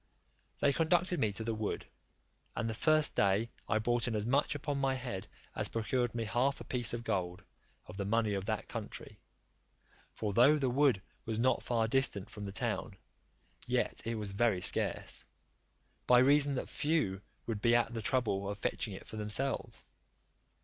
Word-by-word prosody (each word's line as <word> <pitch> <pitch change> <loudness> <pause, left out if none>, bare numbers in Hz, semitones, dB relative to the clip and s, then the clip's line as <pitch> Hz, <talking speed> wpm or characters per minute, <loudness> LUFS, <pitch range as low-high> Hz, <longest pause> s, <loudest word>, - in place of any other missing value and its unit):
They 140 - +4
conducted 175 +3 +2
me 110 - +2
to 105 - -4
the 115 0 -1
wood, 110 -1 -3 0.7
and 115 - -1
the 110 - -2
first 155 +6 +3
day 100 +4 +2 0.2
I 110 - +3
brought 120 +2 +1
in 115 - -1
as 105 0 -1
much 140 +4 +2
upon 145 0 -2
my 135 -1 +1
head 120 -7 -5 0.3
as - - +3
procured 120 +1 -1
me 115 -1 -1
half 130 +5 +1
a - - -7
piece 120 -3 +1
of 120 0 -4
gold, 90 -5 -2 0.4
of - - -10
the 100 - -2
money 110 0 +1
of 95 -1 -2
that - - -2
country; - - -7 0.9
for 105 -2 -3
though 140 +8 +6
the 135 -4 0
wood 130 -7 +3 0.2
was 110 -1 -3
not 130 +3 +2
far 115 -2 0
distant 110 -5 0
from 105 -1 -7
the 100 - -5
town, 110 -2 -2 0.7
yet - - 0
it 115 0 -2
was 105 -2 -3
very 105 -1 +2
scarce, - - 0 0.8
by 125 - +7
reason 140 +2 +5
that - - -3
few 145 - 0 0.2
would 110 -3 -3
be 115 0 +4
at 120 0 +2
the 115 - -3
trouble 105 -5 0
of 100 - -4
fetching 105 -1 -2
it - - -10
for 110 - -8
themselves. 105 +6 -2
115 Hz, 180 wpm, -33 LUFS, 105-130 Hz, 0.9 s, by